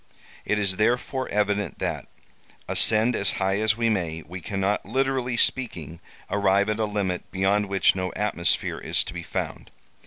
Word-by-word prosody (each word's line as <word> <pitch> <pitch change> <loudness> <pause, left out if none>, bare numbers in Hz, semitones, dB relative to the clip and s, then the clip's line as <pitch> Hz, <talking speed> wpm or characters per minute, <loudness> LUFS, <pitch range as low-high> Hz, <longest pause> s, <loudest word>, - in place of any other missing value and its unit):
It 105 - +1
is 95 -2 +2
therefore 125 +4 0
evident 105 0 0
that, - - -3 0.6
ascend 110 +3 +4
as 100 - +2
high 95 +1 0
as 110 +1 +2
we 115 -1 +1
may, 85 -7 -1
we 90 +2 -8
cannot, 100 +3 -1
literally 130 +1 -1
speaking, 85 - 0 0.3
arrive 100 0 +2
at 110 +1 -1
a 110 - +2
limit 100 -3 -3
beyond 100 +2 +1
which 95 -1 +3
no 95 -1 -2
atmosphere 100 -5 0
is - - +1
to - - -8
be - - -5
found. - - -5
105 Hz, 160 wpm, -25 LUFS, 95-110 Hz, 0.6 s, ascend